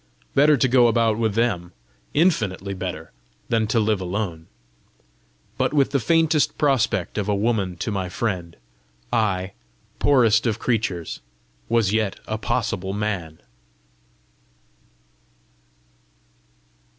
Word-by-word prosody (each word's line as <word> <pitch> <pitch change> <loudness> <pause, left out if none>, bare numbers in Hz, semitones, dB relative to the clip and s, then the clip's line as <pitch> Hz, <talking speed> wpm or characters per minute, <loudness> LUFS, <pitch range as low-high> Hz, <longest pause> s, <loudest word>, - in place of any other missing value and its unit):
Better 145 +1 +5
to 130 - +3
go 125 -1 +5
about 115 -1 +2
with 110 -3 0
them 95 -7 0 0.4
infinitely 105 - +1
better 90 -4 -6 0.4
than 110 -2 +1
to 115 +2 +1
live 105 -2 +1
alone! 90 -3 -4 1.1
But - - +1
with 140 -2 +3
the 140 - +2
faintest 155 0 +2
prospect 115 - +1
of 105 0 -2
a 105 - +2
woman 100 -4 0
to 105 - -3
my 95 -3 -2
friend, 90 -4 -3 0.6
I, 95 -3 0 0.5
poorest 120 -5 +4
of 110 -1 0
creatures, 110 -9 -2 0.5
was 110 -4 +2
yet 110 -3 0
a - - -3
possible 95 +1 -2
man! 100 -7 -3
110 Hz, 115 wpm, -23 LUFS, 95-120 Hz, 1.1 s, Better